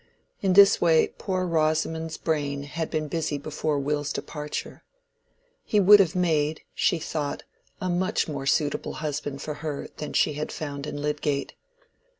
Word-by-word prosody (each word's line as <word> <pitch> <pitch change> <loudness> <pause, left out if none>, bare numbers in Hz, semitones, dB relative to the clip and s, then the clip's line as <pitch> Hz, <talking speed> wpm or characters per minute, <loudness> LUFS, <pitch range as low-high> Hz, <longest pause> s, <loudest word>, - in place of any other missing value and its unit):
In 190 -2 +2
this 200 +1 +7
way 165 -2 +4
poor 185 -2 -1
Rosamond's 160 0 0
brain 145 -3 -1
had 160 +3 -4
been 155 -1 -2
busy 155 -1 -2
before 150 +1 -2
Will's 145 +1 -1
departure. 150 -1 -5 0.8
He 210 - +2
would 205 +1 +8
have 185 -4 +3
made, 160 -4 +1
she 175 - +2
thought, 150 -2 -3 0.4
a 185 - -2
much 180 +1 0
more 140 -3 -4
suitable 145 0 0
husband 145 -2 -4
for 150 - -3
her 150 -3 -4
than 150 - -5
she 150 - +3
had 150 +1 -4
found 145 -1 -5
in 145 - -5
Lydgate. 145 -1 -1
155 Hz, 155 wpm, -26 LUFS, 145-165 Hz, 0.8 s, would